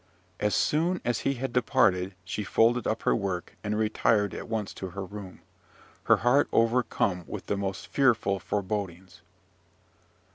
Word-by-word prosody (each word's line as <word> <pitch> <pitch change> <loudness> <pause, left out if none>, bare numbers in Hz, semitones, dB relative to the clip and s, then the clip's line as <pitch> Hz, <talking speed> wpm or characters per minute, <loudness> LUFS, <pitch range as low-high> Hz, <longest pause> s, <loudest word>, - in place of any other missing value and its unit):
As 105 0 +1
soon 170 +4 +1
as 120 -2 0
he 135 - 0
had 130 0 -4
departed, 100 -8 +2
she 105 +3 -3
folded 115 +4 +2
up 110 - -1
her - - +3
work, 95 -4 -3
and 105 0 -1
retired 110 -1 +2
at - - -6
once 110 -3 -3
to 95 - -6
her 95 +2 -6
room, 100 -2 -9 0.6
her 115 - +6
heart 135 +4 +4
overcome 115 -6 +1
with - - -6
the - - -1
most 95 -2 -3
fearful 115 -8 +2
forebodings. 95 -2 -4
105 Hz, 150 wpm, -28 LUFS, 95-120 Hz, 0.6 s, her